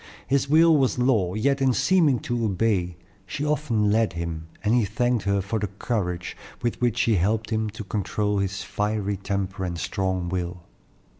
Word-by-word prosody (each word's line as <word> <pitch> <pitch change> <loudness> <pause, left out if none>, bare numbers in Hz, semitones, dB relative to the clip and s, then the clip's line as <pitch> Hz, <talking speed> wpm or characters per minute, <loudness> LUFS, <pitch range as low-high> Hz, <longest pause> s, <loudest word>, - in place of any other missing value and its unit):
His 140 0 +1
will 160 +2 +6
was 135 -4 +2
law; 110 -8 +2
yet 135 +5 +1
in 130 -1 +3
seeming 160 -4 +3
to 120 -1 -2
obey, 95 -4 0 0.3
she 145 +10 -3
often 130 -9 +1
led 110 -2 +2
him, 85 -1 -5 0.2
and 110 +1 +2
he 120 -1 +4
thanked 115 +2 0
her 100 0 +2
for 100 +4 -2
the 105 - -1
courage 95 -3 -3 0.3
with 120 0 -1
which 120 -3 +1
she 115 -3 +3
helped 105 +5 0
him 110 -1 0
to 110 +1 -7
control 105 0 -1
his 95 0 -2
fiery 105 -1 -2
temper 95 -1 -3
and 85 -2 -3
strong 95 +1 -2
will. 90 0 -3
105 Hz, 175 wpm, -25 LUFS, 95-120 Hz, 0.3 s, will